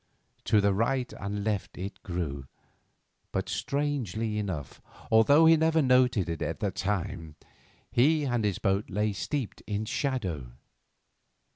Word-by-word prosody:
To 105 - +4
right 125 +5 0
and 100 +1 -3
left 105 -2 -2
it 95 +2 -6
grew, 75 -7 -4 0.8
but, - - -2
strangely 115 -7 -2
enough, 90 -10 -5 0.3
although 140 +8 +6
he 165 0 +8
never 160 0 +3
noted 125 -7 +3
it 85 -2 -4
at - - -2
the 100 - -1
time, 90 -6 -3 0.6
he 150 +5 +3
and 120 -5 0
his 100 -3 0
boat 100 0 0
lay 105 +2 0
steeped 130 +3 -3
in 105 0 -2
shadow. 95 - -2
105 Hz, 130 wpm, -28 LUFS, 95-130 Hz, 0.8 s, he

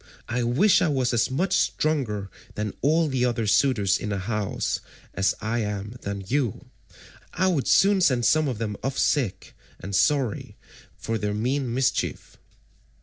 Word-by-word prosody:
I 125 +2 -1
wish 125 - +3
I - - +3
was 130 -4 0
as 115 - +2
much 180 +9 0
stronger 115 -11 0 0.2
than 105 -1 -3
all 160 +4 +3
the 130 -3 -1
other 120 -2 0
suitors 105 -3 +2
in 105 - -4
the 100 - -1
house 105 +1 -2 0.3
as 95 +1 +1
I 115 +3 -1
am 105 +1 -4
than 100 0 -5
you, 130 -2 -1 0.7
I 185 - +1
would 170 -8 +1
soon 200 -1 +4
send 125 -8 +3
some 155 -1 +3
of 125 -5 -2
them 105 -2 -3
off 135 +2 -3
sick 130 -10 0 0.2
and 95 +2 -5
sorry, 135 0 0 0.4
for 115 0 -3
they 105 0 -1
mean 125 +4 -1
mischief." 130 +2 -1
120 Hz, 160 wpm, -25 LUFS, 105-140 Hz, 0.7 s, soon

